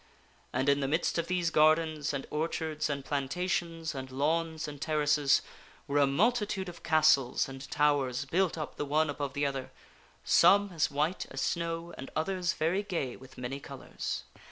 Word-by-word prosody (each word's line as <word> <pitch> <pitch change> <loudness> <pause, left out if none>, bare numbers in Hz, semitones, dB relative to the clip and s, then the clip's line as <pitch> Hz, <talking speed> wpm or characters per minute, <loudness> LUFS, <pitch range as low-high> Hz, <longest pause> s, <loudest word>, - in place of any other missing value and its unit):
And 130 +2 -1
in 140 0 +4
the 135 - 0
midst 160 +3 0
of 165 - -2
these 175 -2 0
gardens 155 -1 +3
and 140 -2 -4
orchards 155 0 -2
and 140 -2 -3
plantations 165 +3 -2
and 130 -1 -6
lawns 160 +4 -1
and 145 -1 -8
ter 155 0 -1
races, 145 -1 +3 0.4
were 145 +1 +1
a 140 - +5
multitude 205 - +1
of 170 -1 -9
castles 155 -5 +3
and 135 0 -9
towers 140 -3 +1
built 175 +4 +1
up 155 - -5
the 145 - -2
one 150 +1 +2
above 140 -1 -4
the 145 +1 0
other 135 -2 -3 0.5
some 200 0 +5
as 160 -2 +1
white 150 +5 -1
as 135 - -6
snow 170 +3 -2
and 135 - -7
others 180 +1 0
very 170 +5 0
gay 170 -11 -3
with 130 0 -15
many 125 +2 -4
colors. - - -6
155 Hz, 175 wpm, -30 LUFS, 140-170 Hz, 0.5 s, a